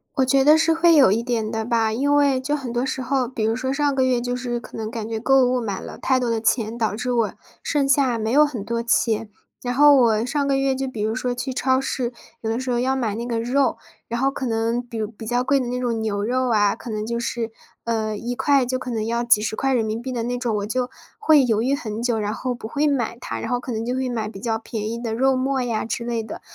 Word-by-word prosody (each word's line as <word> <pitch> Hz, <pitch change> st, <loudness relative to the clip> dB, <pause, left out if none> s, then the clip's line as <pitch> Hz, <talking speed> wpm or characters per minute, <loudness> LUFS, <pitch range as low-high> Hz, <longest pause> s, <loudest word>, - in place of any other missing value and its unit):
我 265 Hz, -, +3 dB
觉 270 Hz, +1 st, +3 dB
得 305 Hz, +2 st, +7 dB
是 325 Hz, 0 st, +3 dB
会 330 Hz, 0 st, +5 dB
有 270 Hz, -10 st, +6 dB
一 225 Hz, +3 st, +2 dB
点 230 Hz, -3 st, -2 dB
的 220 Hz, 0 st, -2 dB
吧。 225 Hz, -2 st, +1 dB
因 285 Hz, +4 st, +2 dB
为 280 Hz, -3 st, +3 dB
就 290 Hz, +3 st, -1 dB
很 255 Hz, -5 st, -5 dB
多 240 Hz, +1 st, 0 dB
时 265 Hz, -, -3 dB
候 255 Hz, -1 st, 0 dB
比 230 Hz, -3 st, -4 dB
如 225 Hz, +1 st, +1 dB
说 260 Hz, +2 st, -2 dB
上 285 Hz, 0 st, +1 dB
个 260 Hz, -1 st, +2 dB
月， 255 Hz, -2 st, +2 dB
就 245 Hz, 0 st, -2 dB
是 240 Hz, -1 st, -3 dB
可 -, -, -12 dB
能 220 Hz, -1 st, -3 dB
感 225 Hz, -2 st, -5 dB
觉 225 Hz, -1 st, -3 dB
购 270 Hz, +2 st, +4 dB
物 250 Hz, 0 st, +1 dB
买 200 Hz, -4 st, -3 dB
了 -, -, -9 dB
太 260 Hz, -1 st, +2 dB
多 245 Hz, -2 st, -1 dB
的 225 Hz, -1 st, 0 dB
钱， 225 Hz, -1 st, +1 dB
导 220 Hz, -3 st, 0 dB
致 250 Hz, +2 st, -2 dB
我 230 Hz, -3 st, +1 dB, 0.3 s
剩 285 Hz, -3 st, +1 dB
下 265 Hz, -3 st, +3 dB
没 220 Hz, +1 st, -2 dB
有 295 Hz, +3 st, +6 dB
很 245 Hz, -9 st, -4 dB
多 230 Hz, +1 st, -1 dB
钱。 225 Hz, -2 st, +1 dB, 0.3 s
然 245 Hz, 0 st, -2 dB
后 290 Hz, +2 st, +7 dB
我 230 Hz, -3 st, +3 dB
上 280 Hz, +2 st, -1 dB
个 275 Hz, -, +2 dB
月 270 Hz, 0 st, +1 dB
就 270 Hz, 0 st, -2 dB
比 225 Hz, -5 st, -5 dB
如 220 Hz, +1 st, 0 dB
说 250 Hz, +1 st, -1 dB
去 255 Hz, +2 st, -4 dB
超 260 Hz, 0 st, +2 dB
市， 250 Hz, -2 st, -2 dB, 0.3 s
有 220 Hz, -, -3 dB
的 230 Hz, +2 st, -1 dB
时 260 Hz, -1 st, -4 dB
候 240 Hz, -, +1 dB
要 260 Hz, +2 st, +1 dB
买 225 Hz, -6 st, -1 dB
那 235 Hz, -, -4 dB
个 235 Hz, -2 st, -1 dB
肉， 255 Hz, +1 st, +1 dB, 0.3 s
然 235 Hz, +2 st, -3 dB
后 270 Hz, -, +3 dB
可 265 Hz, -, -4 dB
能 230 Hz, +1 st, 0 dB
比 235 Hz, -1 st, -8 dB
如 215 Hz, -1 st, -1 dB
比 225 Hz, 0 st, -11 dB
较 245 Hz, +2 st, 0 dB
贵 275 Hz, +1 st, +2 dB
的 255 Hz, -, -2 dB
那 250 Hz, +1 st, -2 dB
种 235 Hz, -2 st, -1 dB
牛 205 Hz, -2 st, -1 dB
肉 255 Hz, +2 st, 0 dB
啊， 205 Hz, -1 st, +3 dB
可 235 Hz, -, -10 dB
能 215 Hz, 0 st, -3 dB
就 235 Hz, 0 st, -2 dB
是， 230 Hz, -1 st, -3 dB, 0.3 s
呃， 220 Hz, -2 st, -1 dB
1 240 Hz, +3 st, -4 dB
块 275 Hz, -2 st, +3 dB
就 255 Hz, 0 st, -1 dB
可 255 Hz, -1 st, -6 dB
能 220 Hz, -2 st, -1 dB
要 235 Hz, +1 st, -1 dB
几 235 Hz, -3 st, +4 dB
十 220 Hz, 0 st, -2 dB
块 270 Hz, 0 st, 0 dB
人 235 Hz, -3 st, +2 dB
民 220 Hz, +1 st, -2 dB
币 260 Hz, +2 st, -5 dB
的 240 Hz, -2 st, -2 dB
那 245 Hz, +1 st, -2 dB
种， 240 Hz, -3 st, -1 dB
我 200 Hz, -, -2 dB
就 250 Hz, +2 st, -1 dB, 0.3 s
会 310 Hz, -, +5 dB
犹 225 Hz, -2 st, +1 dB
豫 270 Hz, +2 st, +1 dB
很 225 Hz, -4 st, -3 dB
久， 235 Hz, -3 st, +1 dB
然 210 Hz, 0 st, -1 dB
后 255 Hz, -1 st, -2 dB
不 235 Hz, -2 st, -7 dB
会 285 Hz, +6 st, 0 dB
买 245 Hz, -5 st, 0 dB
它， -, -, -5 dB
然 -, -, -4 dB
后 245 Hz, 0 st, 0 dB
可 255 Hz, -, -6 dB
能 225 Hz, 0 st, -2 dB
就 250 Hz, +2 st, -2 dB
会 260 Hz, 0 st, -1 dB
买 220 Hz, -3 st, -2 dB
比 195 Hz, -, -10 dB
较 225 Hz, 0 st, -1 dB
便 220 Hz, -1 st, -4 dB
宜 235 Hz, +1 st, -5 dB
的 225 Hz, -2 st, -2 dB
肉 265 Hz, +2 st, +3 dB
末 265 Hz, 0 st, 0 dB
呀 230 Hz, -3 st, -1 dB
之 235 Hz, -, -3 dB
类 235 Hz, -1 st, -1 dB
的。 215 Hz, -, -8 dB
245 Hz, 305 characters per minute, -22 LUFS, 225-260 Hz, 0.3 s, 得